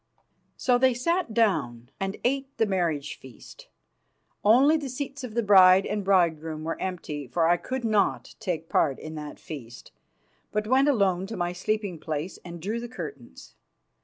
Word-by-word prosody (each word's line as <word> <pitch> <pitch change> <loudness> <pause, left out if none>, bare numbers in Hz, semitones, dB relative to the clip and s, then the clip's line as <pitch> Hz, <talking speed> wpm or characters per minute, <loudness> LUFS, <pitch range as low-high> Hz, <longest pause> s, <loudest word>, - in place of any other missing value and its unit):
So 245 -1 +2
they 260 -1 +4
sat 335 +3 0
down 125 - 0
and 195 +1 -3
ate 270 +2 -1
the 225 - +3
marriage 170 -7 -1
feast. 130 -3 -14 0.8
Only 255 +9 +6
the 295 -4 -3
seats 275 +1 -5
of 235 -3 -7
the 235 - +1
bride 190 -2 +7
and 210 -1 -2
bridegroom 165 -5 +1
were 165 +1 -4
empty, 155 -6 -4
for 165 +5 +1
I 175 +1 +4
could 255 +5 -4
not 215 -3 +1
take 175 -7 -3
part 140 -5 +2
in 155 - -8
that 150 -1 -7
feast, 120 -6 -10 0.6
but 210 0 -1
went 260 +5 +3
alone 195 -7 +1
to 225 - -6
my 175 0 -1
sleeping 195 -1 -2
place 155 +3 -4
and 170 -1 -8
drew 210 +7 -3
the 240 0 -7
curtains. 145 - -9
190 Hz, 165 wpm, -26 LUFS, 160-235 Hz, 0.8 s, bride